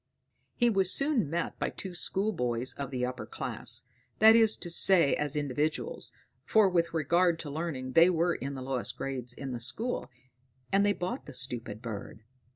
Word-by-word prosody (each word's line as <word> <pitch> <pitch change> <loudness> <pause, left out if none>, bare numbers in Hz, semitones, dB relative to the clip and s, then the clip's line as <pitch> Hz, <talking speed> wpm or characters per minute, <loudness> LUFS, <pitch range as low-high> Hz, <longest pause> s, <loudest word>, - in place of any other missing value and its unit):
He 240 - +3
was 195 -5 +3
soon 275 - +3
met 170 +3 -3
by - - 0
two 190 -2 -7
schoolboys 130 - 0
of 140 -2 -5
the 125 -2 -2
upper 125 0 -5
class - - -4 0.3
that 220 +1 +8
is 225 -2 +5
to 175 - -5
say 170 -4 +4
as 150 0 -1
individuals, 150 - -2 0.3
for 215 -2 +4
with 170 -2 +1
regard 170 +2 +2
to 145 - -7
learning 140 -5 -4
they 165 +6 +6
were 175 0 +1
in 140 -2 -5
the 130 - -6
lowest 130 -2 -3
class 130 -3 -4
in 135 +1 -6
the 120 - -4
school; 225 - -3 0.6
and 195 +1 +4
they 205 0 +3
bought 185 +8 -5
the 145 - -9
stupid 120 -4 -4
bird. 110 -1 -7
160 Hz, 175 wpm, -29 LUFS, 130-190 Hz, 0.6 s, that